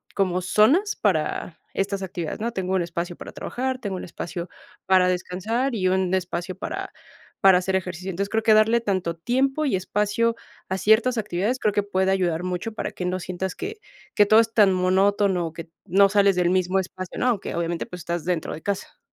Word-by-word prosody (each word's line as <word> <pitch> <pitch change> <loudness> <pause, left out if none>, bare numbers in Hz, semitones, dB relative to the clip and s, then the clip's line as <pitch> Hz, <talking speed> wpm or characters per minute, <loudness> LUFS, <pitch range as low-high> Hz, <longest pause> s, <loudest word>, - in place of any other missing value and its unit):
como 185 -2 +1
zonas 265 - +3
para 165 -2 -1
estas 195 0 -2
actividades, 175 -2 -5
¿no? 235 +2 -2
Tengo 190 -3 -2
un 185 - +2
espacio 170 +1 -4
para - - -9
trabajar, 260 +1 -3
tengo 205 -5 -4
un 185 - -6
espacio 170 +1 -6 0.4
para 185 -1 +4
descansar 190 +8 -1
y 185 -4 +1
un 185 0 +1
espacio 180 0 -2
para 190 - -5 0.5
para 190 -2 +7
hacer 190 +1 -1
ejercicio. 185 0 -3
Entonces, 200 +3 -3
creo 220 0 0
que 220 -1 +5
darle 220 +2 +5
tanto 185 -6 -1
tiempo 270 - 0
y 270 - +1
espacio 210 +4 0 0.3
a 190 - -1
ciertas 225 +5 +3
actividades 210 +4 -1
creo 210 - +1
que 205 - +1
puede 190 -1 +1
ayudar 175 -3 0
mucho 185 +4 -3
para - - -4
que 180 - -5
no 180 +1 -1
sientas 185 +1 -4
que 425 +3 -5 0.4
que 205 - +6
todo 215 +2 +7
es 225 0 +1
tan 210 -4 +5
monótono, 185 -1 +2
que 165 +1 -9 0.2
no 195 +1 +5
sales 200 -1 +4
del 180 0 +2
mismo 185 0 +1
espacio, 185 -1 -6
¿no? - - +1
Aunque 220 -5 -1
obviamente, 170 0 -2
pues, 180 -1 -8
estás 170 -1 -3
dentro 175 -3 -1
de 155 - -8
casa. 200 -1 -4
190 Hz, 200 wpm, -24 LUFS, 180-215 Hz, 0.5 s, para